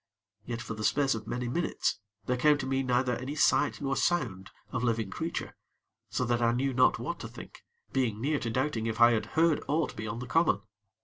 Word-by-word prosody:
Yet, 120 Hz, -1 st, -4 dB
for -, -, -5 dB
the 110 Hz, 0 st, -6 dB
space 140 Hz, +3 st, +2 dB
of 110 Hz, -1 st, -6 dB
many 125 Hz, 0 st, -2 dB
minutes, 170 Hz, +8 st, -1 dB, 0.3 s
there 125 Hz, -, +1 dB
came 150 Hz, +4 st, +4 dB
to 140 Hz, -, -4 dB
me 135 Hz, 0 st, 0 dB
neither 125 Hz, -1 st, +1 dB
any 135 Hz, +4 st, -5 dB
sight 150 Hz, -, +3 dB
nor 135 Hz, -1 st, 0 dB
sound 120 Hz, -, 0 dB, 0.2 s
of 125 Hz, -1 st, -2 dB
living 115 Hz, -4 st, 0 dB
creature; 165 Hz, +10 st, -4 dB, 0.5 s
so 125 Hz, -, -1 dB
that 120 Hz, 0 st, +1 dB
I 115 Hz, 0 st, +3 dB
knew 135 Hz, +2 st, 0 dB
not 125 Hz, +1 st, +4 dB
what -, -, -4 dB
to -, -, -6 dB
think, -, -, -12 dB, 0.3 s
being 120 Hz, -6 st, 0 dB
near 145 Hz, +4 st, 0 dB
to 115 Hz, -, -3 dB
doubting 125 Hz, -1 st, -1 dB
if 110 Hz, 0 st, -3 dB
I 120 Hz, 0 st, +8 dB
had 115 Hz, -2 st, 0 dB
heard 165 Hz, -1 st, +4 dB
aught 155 Hz, +2 st, 0 dB
beyond 110 Hz, +2 st, -4 dB
the -, -, -8 dB
common. 155 Hz, -8 st, +3 dB
125 Hz, 210 wpm, -29 LUFS, 115-140 Hz, 0.5 s, I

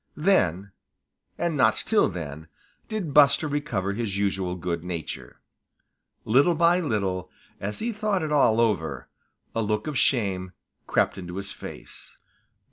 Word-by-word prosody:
Then, 100 Hz, -, +2 dB, 0.7 s
and 170 Hz, -2 st, -1 dB
not 130 Hz, -, +4 dB
till 220 Hz, -2 st, +2 dB
then, 80 Hz, -4 st, -7 dB, 0.4 s
did 195 Hz, -9 st, -3 dB
Buster 150 Hz, +2 st, +6 dB
recover 140 Hz, -10 st, -2 dB
his 105 Hz, -2 st, -3 dB
usual 95 Hz, -3 st, -1 dB
good 85 Hz, -2 st, -3 dB
nature. 85 Hz, -3 st, -6 dB, 0.9 s
Little 140 Hz, +10 st, +4 dB
by 170 Hz, +2 st, +4 dB
little, 100 Hz, -, -1 dB, 0.3 s
as 105 Hz, +2 st, -4 dB
he 235 Hz, +2 st, -2 dB
thought 210 Hz, -4 st, 0 dB
it 155 Hz, -, -3 dB
all 115 Hz, -6 st, +4 dB
over, 80 Hz, -, 0 dB, 0.5 s
a 115 Hz, -, 0 dB
look 105 Hz, 0 st, -1 dB
of 150 Hz, -4 st, -1 dB
shame 95 Hz, -7 st, +1 dB, 0.3 s
crept -, -, +1 dB
into 90 Hz, -1 st, -7 dB
his 100 Hz, +1 st, -5 dB
face. -, -, -11 dB
105 Hz, 135 wpm, -26 LUFS, 90-150 Hz, 0.9 s, Buster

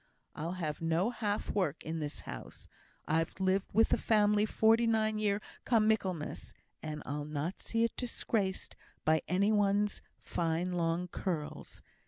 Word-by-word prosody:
I'll 165 Hz, +3 st, -3 dB
have 160 Hz, -5 st, -3 dB
no 165 Hz, +7 st, +1 dB
half 210 Hz, -3 st, -2 dB
work 170 Hz, -7 st, -1 dB
in 160 Hz, +1 st, -3 dB
this 150 Hz, -1 st, -4 dB
house. -, -, -9 dB, 0.4 s
I've 165 Hz, +4 st, 0 dB
lived 190 Hz, +1 st, +2 dB
with 225 Hz, +3 st, +4 dB
the -, -, +2 dB
family 210 Hz, -1 st, +3 dB
forty 225 Hz, +2 st, +4 dB
nine 220 Hz, -1 st, +2 dB
year 210 Hz, -1 st, +1 dB, 0.2 s
come 225 Hz, -3 st, +3 dB
Michaelmas, 175 Hz, -, -1 dB, 0.3 s
and 150 Hz, -1 st, -5 dB
I'll 145 Hz, +1 st, -3 dB
not 150 Hz, +5 st, -3 dB
see 230 Hz, 0 st, 0 dB
it 230 Hz, -, 0 dB
disgraced 215 Hz, -5 st, -2 dB, 0.3 s
by 155 Hz, 0 st, +4 dB
any 200 Hz, +4 st, +3 dB
one's 205 Hz, 0 st, +2 dB, 0.2 s
fine 170 Hz, +1 st, -1 dB
long 170 Hz, 0 st, 0 dB
curls. 165 Hz, -4 st, -4 dB
190 Hz, 150 wpm, -33 LUFS, 160-215 Hz, 0.4 s, with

